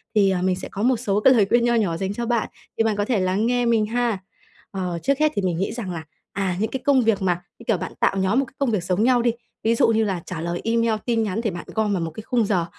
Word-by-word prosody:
Thì, 200 -2 +5
à, 180 - 0
mình 185 0 +1
sẽ 190 - -7
có 200 - -3
một 250 0 +3
số 205 -3 0
cái 260 +5 +6
lời 220 -5 +4
khuyên 240 0 +3
nho 240 - +2
nhỏ 195 -8 +1
dành 195 +2 -2
cho 235 +3 -3
bạn, 235 -1 0 0.3
thì - - +3
bạn 220 -2 +1
có 205 0 0
thể 235 -4 +1
lắng 185 +3 +1
nghe 245 0 +1
mình 225 -2 +3
ha. 235 -2 0 0.5
Ờ, 180 -3 -3
trước 275 +1 +1
hết 305 0 +3
thì 200 - 0
mình 180 -3 -1
nghĩ 190 - -1
rằng 220 -6 -5
là, 165 -2 -5 0.3
à, 190 -3 -1
những 220 +1 -1
cái 265 - -3
công 275 -2 +4
việc 225 -4 +1
mà, 175 -2 0 0.2
như - - -12
kiểu, 225 - +2
bạn - - -6
tạo 195 - +2
nhóm 190 +6 +2
một 275 - +1
cái - - -18
công 275 -4 0
việc 205 -5 0
giống 180 +3 0
nhau 245 0 +4
đi, 235 0 +2 0.3
ví 230 +1 +3
dụ - - +4
như 225 -1 +3
là 190 -5 -2
trả 170 -3 -5
lời 170 +1 -3
email, 230 0 +1
tin 230 -2 +1
nhắn 210 +1 -2
thì 225 -3 -1
bạn 175 -1 -7
gom 215 -2 +1
vào 185 - -1
một 165 -1 -3
cái 220 - -9
khung 235 -2 +1
giờ 185 -5 +1
215 Hz, 310 wpm, -23 LUFS, 190-235 Hz, 0.5 s, cái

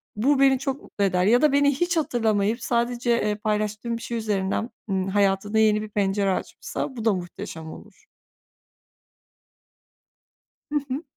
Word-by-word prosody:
bu 270 +6 +2
beni 270 -1 +5
çok 270 0 -3
mutlu 200 - -4
eder 180 -2 +2
ya 240 +6 +4
da 305 -2 +4
beni 285 0 +4
hiç 350 +3 0
hatırlamayıp 225 -5 +1
sadece, 240 0 0
eee, 210 -3 +1
paylaştığım 215 +2 -2
bir 230 - -11
şey 235 - -4
üzerinden, 210 +1 -1 0.2
ımm, 190 0 0
hayatında 200 +2 +1
yeni 215 -1 +4
bir 215 - -6
pencere 200 -1 +1
açmışsa, 260 - -5
bu 230 -1 -5
da 220 - +4
muhteşem 165 -3 -7
olur. - - -14 2.7
Hı 295 - +3
hı. 270 +5 -3
220 Hz, 150 wpm, -24 LUFS, 200-250 Hz, 2.7 s, beni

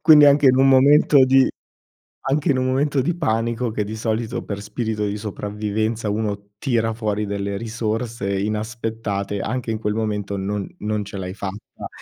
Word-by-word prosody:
quindi 150 -3 +8
anche 145 0 +5
in 130 0 +6
un 135 +1 +5
momento 140 +1 +6
di 130 0 +5 0.8
anche 145 +3 +2
in 130 - +1
un 130 - 0
momento 135 +2 +1
di 165 +6 -1
panico 115 -5 -1
che 105 -1 -1
di 110 +2 -5
solito 110 +1 -2
per 100 -1 -5
spirito 110 -1 -3
di 100 0 -2
sopravvivenza 105 +1 -3
uno 100 -1 -3
tira 115 -2 0
fuori 105 -2 -2
delle 100 0 -3
risorse 110 -1 -2
inaspettate, 110 -2 -3
anche 120 +2 -2
in 110 - -2
quel 105 -1 -1
momento 105 -2 -2
non 100 +1 -3
non 105 -1 -2
ce 100 0 -7
l'hai 95 -1 -5
fatta, 100 +1 -7
110 Hz, 170 wpm, -22 LUFS, 105-125 Hz, 0.8 s, quindi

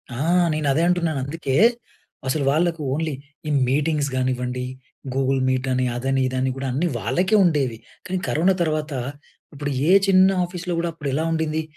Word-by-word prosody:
ఆ! - - -5 0.3
నేను 155 -1 -1
అదే 160 - +1
అంటున్నానందుకే, 155 -5 -1 0.7
అసలు 140 +2 0
వాళ్ళకు 165 +1 +1
ఓన్లీ 155 0 -1 0.3
ఈ - - -1 0.2
మీటింగ్స్ 145 +1 +1
కానివ్వండి, 125 0 -1 0.5
గూగుల్ 135 0 +1
మీట్ 130 0 0
అని 130 0 +1
అదని 135 +2 0
ఇదని 130 +1 -1
కూడా 135 0 -4
అన్నీ 155 +7 0
వాళ్ళకే 180 - +1
ఉండేవి. 140 -9 +1 0.3
కానీ 185 - -2
కరోనా 180 +5 +2
తర్వాత 155 -2 -1 0.6
ఇప్పుడు 145 0 -4 0.2
ఏ 185 - +6
చిన్న 190 0 +6
ఆఫీస్‌లో 175 0 -4
కూడా 170 0 -1
అప్పుడు 150 -3 -5
ఎలా 155 +4 0
ఉండింది. 160 -1 0
150 Hz, 155 wpm, -22 LUFS, 130-165 Hz, 0.7 s, ఏ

